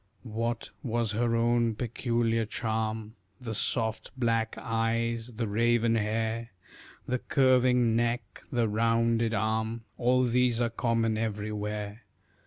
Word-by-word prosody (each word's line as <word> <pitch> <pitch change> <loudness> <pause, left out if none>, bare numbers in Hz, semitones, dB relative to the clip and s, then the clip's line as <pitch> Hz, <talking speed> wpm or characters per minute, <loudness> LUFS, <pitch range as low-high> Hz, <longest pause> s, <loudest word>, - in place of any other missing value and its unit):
What 115 0 -3
was 115 -3 -1
her 115 +2 +1
own 115 -1 +2
peculiar 115 -1 0
charm? 110 -1 -2 0.3
The 115 -3 -5
soft 110 0 -1
black 115 -2 +1
eyes, 115 +1 -1
the 115 0 -2
raven 115 +2 +2
hair, 115 +1 -1 0.6
The 125 0 0
curving 125 -3 +3
neck, 115 -2 -1
the 120 -3 +2
rounded 115 +1 +2
arm, 110 +2 -1 0.2
All 125 +1 +3
these 125 -1 +2
are 120 -1 +1
common 115 -2 +1
everywhere. 105 0 -3
115 Hz, 115 wpm, -29 LUFS, 110-120 Hz, 0.6 s, curving